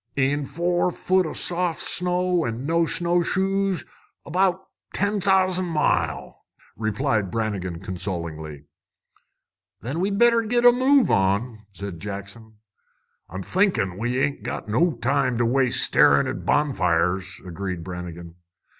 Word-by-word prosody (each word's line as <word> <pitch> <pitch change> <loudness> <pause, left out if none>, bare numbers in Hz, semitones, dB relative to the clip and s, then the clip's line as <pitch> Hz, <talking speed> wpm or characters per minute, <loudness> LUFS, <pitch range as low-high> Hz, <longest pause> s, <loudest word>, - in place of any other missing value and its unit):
"In 140 +1 0
four 175 +3 0
foot 185 0 +1
o' - - -5
soft 175 -2 -1
snow, 180 -1 0
an' 120 +1 -4
no 165 +2 +2
snowshoes, 190 +2 0 0.4
about 185 +3 0 0.3
ten 205 0 0
thousan' 185 -1 +2
mile!" 95 - -1 0.3
replied 110 -2 -1
Brannigan 95 -5 -3
consolingly. 85 -6 -5 1.2
"Then 135 +8 -4
we'd 195 +2 0
better 235 +1 +5
git 240 +2 0
a 245 - +10
move 260 +2 +3
on," 100 +5 +1
said 100 -3 -7
Jackson. 100 +3 -8 0.7
"I'm 95 +3 -6
thinkin' 120 - +1
we 120 +5 -2
ain't 140 +1 -1
got - - -5
no 160 +11 +2
time 125 -1 0
to 120 - +1
waste 130 +1 +2
starin' 70 0 +4
at - - -5
bonfires," 95 - +1
agreed 90 -1 -5
Brannigan. 85 -1 -8
130 Hz, 125 wpm, -23 LUFS, -, 1.2 s, a